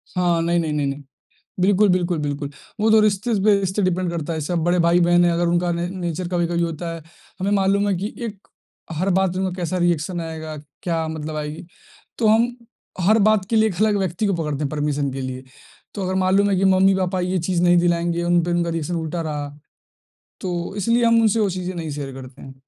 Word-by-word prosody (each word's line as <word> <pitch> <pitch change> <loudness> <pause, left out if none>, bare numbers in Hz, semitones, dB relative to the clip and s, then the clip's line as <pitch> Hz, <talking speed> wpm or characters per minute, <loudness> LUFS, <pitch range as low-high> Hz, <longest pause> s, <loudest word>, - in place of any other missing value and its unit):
हाँ, 175 -2 +2
नहीं, 170 +1 +1
नहीं, 155 -2 -1
नहीं, 145 -2 0
नहीं। 140 +1 -4 0.6
बिल्कुल, 200 +2 +4
बिल्कुल, 180 -2 +1
बिल्कुल, 145 -1 -3 0.3
वो 220 +1 +3
तो 220 - +7
रिश्तेस 215 +2 +1
पे 205 -2 +5
इससे 190 +2 -1
डिपेंड 185 -1 0
करता 170 -1 -3
है, 160 - -3
जैसे 155 +4 -3
आप 170 - +1
बड़े 175 +2 +1
भाई-बहन 175 +1 +4
हैं, 175 - +3
अगर 170 +1 +1
उनका 175 +1 +1
न 170 +1 -2
नेचर 175 0 -3
कभी-कभी 175 -1 0
होता 170 0 -3
है, 165 - -8 0.4
हमें 195 +2 -1
मालूम 200 +1 +2
है 200 - +2
कि 200 +5 -4
एक 210 -3 -9 0.5
हर 185 +4 0
बात 190 -2 +1
में 190 - -1
उनका 180 - -3
कैसा 175 +2 -1
रिएक्शन 175 0 0
आएगा, 160 -1 -6 0.3
क्या 165 -2 -1
मतलब 155 -1 -5
आएगी? 150 +2 -5 0.5
तो 225 - +2
हम 230 +3 +4 0.5
हर 215 +5 +4
बात 215 -3 +3
के 225 - +2
लिए 220 0 +4
एक 190 - -5
अलग 215 -1 +3
व्यक्ति 190 +2 -1
को 195 - +1
पकड़ते 150 -4 -2
हैं 140 - 0
परमिशन 145 -1 -1
के 135 - -5
लिए, 130 0 -5 0.5
तो 200 - -4
अगर 185 - -1
मालूम 200 +2 +3
है 195 - +2
कि 190 - +1
मम्मी-पापा 190 -1 +3
ये 185 +1 0
चीज़ 175 -2 +1
नहीं 175 0 +5
दिलाएँगे, 170 0 +1
उन 175 0 +2
पे 175 - -2
उनका 175 -1 0
रिएक्शन 165 +1 -3
उल्टा 165 +1 -3
रहा। 150 -2 -4 0.9
तो 175 -1 -3
इसलिए 230 +4 +2
हम 230 0 +5
उनसे 220 0 +3
वो 205 - +2
चीज़ें 185 0 -4
नहीं 165 -3 -4
शेयर 140 -2 -5
करते 130 0 -11
हैं। 135 0 -10
175 Hz, 220 wpm, -21 LUFS, 160-190 Hz, 0.9 s, तो